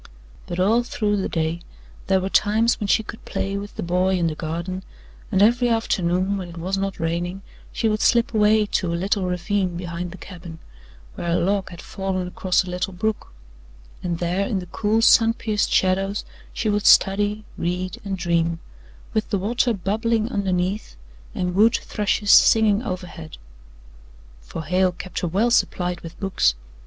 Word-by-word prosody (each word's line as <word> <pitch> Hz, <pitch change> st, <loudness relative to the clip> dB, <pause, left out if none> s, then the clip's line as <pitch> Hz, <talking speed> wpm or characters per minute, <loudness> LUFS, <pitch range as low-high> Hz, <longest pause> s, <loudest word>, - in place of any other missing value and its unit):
But 175 Hz, -, -4 dB
all 215 Hz, +6 st, +4 dB
through 210 Hz, -3 st, -1 dB
the 195 Hz, -, -2 dB
day 165 Hz, +1 st, -1 dB, 0.5 s
there 190 Hz, -1 st, +3 dB
were 185 Hz, -, -2 dB
times 220 Hz, +4 st, +2 dB
when 205 Hz, -, -2 dB
she 220 Hz, -, +3 dB
could 225 Hz, -, -10 dB
play 195 Hz, 0 st, -3 dB
with 200 Hz, +1 st, -6 dB
the -, -, -4 dB
boy 180 Hz, +2 st, +1 dB
in 175 Hz, -, 0 dB
the 160 Hz, -, 0 dB
garden, 170 Hz, +4 st, -4 dB, 0.5 s
and 195 Hz, -1 st, +4 dB
every 240 Hz, +3 st, +4 dB
afternoon, 190 Hz, -4 st, 0 dB
when 185 Hz, -2 st, -6 dB
it 170 Hz, -, -11 dB
was 185 Hz, +4 st, -2 dB
not 195 Hz, -1 st, -3 dB
raining, 175 Hz, +3 st, -2 dB, 0.3 s
she 230 Hz, -, -1 dB
would 215 Hz, 0 st, 0 dB
slip 235 Hz, 0 st, +3 dB
away 215 Hz, 0 st, +4 dB
to 185 Hz, -3 st, -1 dB
a -, -, -1 dB
little 195 Hz, +2 st, 0 dB
ravine 180 Hz, 0 st, -1 dB
behind 175 Hz, 0 st, -5 dB
the 190 Hz, -, -10 dB
cabin, 170 Hz, -3 st, -10 dB, 0.6 s
where 170 Hz, -, -4 dB
a 170 Hz, -, +2 dB
log 195 Hz, +3 st, 0 dB
had 175 Hz, -1 st, -10 dB
fallen 190 Hz, -2 st, -3 dB
across 185 Hz, +1 st, +1 dB
a 180 Hz, -, -8 dB
little 180 Hz, +1 st, -3 dB
brook, 215 Hz, +4 st, -3 dB, 0.7 s
and 175 Hz, -2 st, -2 dB
there 180 Hz, +3 st, -1 dB
in 205 Hz, -, -1 dB
the 185 Hz, -, -4 dB
cool, 215 Hz, +5 st, 0 dB
sun 225 Hz, 0 st, +6 dB
pierced 215 Hz, -3 st, -1 dB
shadows 195 Hz, +2 st, +1 dB, 0.3 s
she 225 Hz, -, -3 dB
would 205 Hz, 0 st, +1 dB
study, 205 Hz, +2 st, +4 dB
read 180 Hz, +1 st, -3 dB
and 195 Hz, -2 st, -3 dB
dream 170 Hz, -1 st, 0 dB, 0.6 s
with 220 Hz, -, -1 dB
the 205 Hz, -, +1 dB
water 235 Hz, +6 st, +1 dB
bubbling 220 Hz, +3 st, -1 dB
underneath 190 Hz, -, -1 dB, 0.4 s
and 180 Hz, 0 st, -1 dB
wood 215 Hz, +5 st, +4 dB
thrushes 205 Hz, 0 st, 0 dB
singing 220 Hz, -2 st, +6 dB
overhead. 180 Hz, -7 st, -7 dB, 1.0 s
For -, -, -7 dB
Hale 180 Hz, +3 st, +2 dB
kept 185 Hz, +1 st, -6 dB
her 175 Hz, -, -1 dB
well 205 Hz, +8 st, +1 dB
supplied 180 Hz, -6 st, +1 dB
with 165 Hz, 0 st, -10 dB
books. 195 Hz, -, +1 dB
190 Hz, 175 wpm, -23 LUFS, 175-210 Hz, 1.0 s, sun